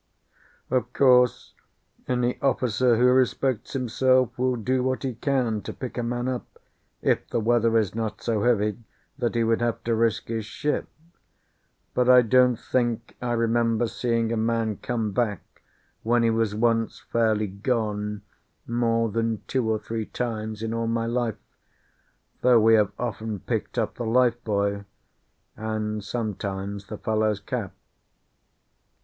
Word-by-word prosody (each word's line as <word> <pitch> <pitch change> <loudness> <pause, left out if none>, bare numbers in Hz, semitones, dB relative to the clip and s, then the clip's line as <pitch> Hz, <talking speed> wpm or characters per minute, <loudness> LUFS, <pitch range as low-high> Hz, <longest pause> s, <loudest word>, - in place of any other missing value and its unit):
Of 125 -1 0
course, 125 -2 +4 0.5
any 125 -1 0
officer 125 -3 +2
who 125 - +4
respects 130 -2 +1
himself 130 -1 +2
will 130 0 +1
do 125 +3 0
what 130 +1 -1
he 130 -2 -2
can 120 -3 0
to - - -6
pick 130 - -7
a 125 - -1
man 120 +1 -2
up, 125 -2 -5 0.5
if - - +1
the 120 - 0
weather 115 0 +3
is 105 -4 +1
not 110 -1 -3
so 110 -3 -1
heavy 105 -2 +1 0.4
that 120 -1 -1
he 115 - +2
would 115 +1 +1
have 120 -1 -1
to 115 - 0
risk 115 -1 0
his 115 -1 -2
ship; 150 +6 -2 1.1
but 125 0 +2
I 125 -1 +8
don't 125 +2 +4
think 120 -1 -2
I 120 -1 -1
remember 115 0 +1
seeing 115 -1 -1
a 115 - 0
man 110 -2 0
come 115 -4 -2
back 105 -4 -3 0.4
when 120 +1 +2
he 115 - +3
was 110 -2 0
once 115 0 +1
fairly 110 -2 +2
gone 105 0 -2 0.4
more 115 -1 +1
than 115 0 -1
two 125 -4 -1
or 110 - +2
three 110 0 -5
times 110 -2 -4
in 115 0 -2
all 115 0 -1
my 115 0 0
life, 115 -2 -1 1.0
though 125 -2 +6
we 110 +1 +5
have 105 -3 +4
often 110 -2 -3
picked - - -4
up - - -1
the 120 - -3
life 120 0 +2
buoy, 100 -1 0 0.7
and 110 -1 -3
sometimes 100 -2 -4
the 105 - -6
fellow's 110 -1 0
cap. 105 0 -4
115 Hz, 150 wpm, -25 LUFS, 110-125 Hz, 1.1 s, I